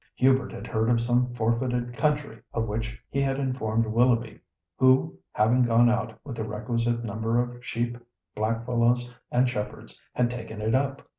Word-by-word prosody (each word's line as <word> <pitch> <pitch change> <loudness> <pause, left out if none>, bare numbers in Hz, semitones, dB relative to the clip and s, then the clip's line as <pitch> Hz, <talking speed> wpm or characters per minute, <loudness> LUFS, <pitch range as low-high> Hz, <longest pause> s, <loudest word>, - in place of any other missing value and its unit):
Hubert 130 0 +3
had - - -7
heard 110 0 0
of 120 -1 +3
some 120 +1 +1
"forfeited" 120 +1 0
country, 145 -4 -1
of 115 -1 +1
which 115 +2 -4
he 140 - 0
had 135 -1 0
informed 115 -4 0
Willoughby, 115 0 +2 0.4
who, 130 +6 +4 0.2
having 120 +4 +3
gone 120 0 +5
out 115 -1 -2
with 130 -5 -6
the 110 - -2
requisite 115 +2 -1
number 115 +2 0
of 120 0 -3
sheep, 120 0 -2 0.4
blackfellows, 115 +2 +1 0.2
and 125 +1 +3
shepherds, 105 -4 -5
had 120 -1 +2
"taken 115 -3 -7
it 110 +1 0
up." 135 +1 0
120 Hz, 160 wpm, -26 LUFS, 115-125 Hz, 0.4 s, gone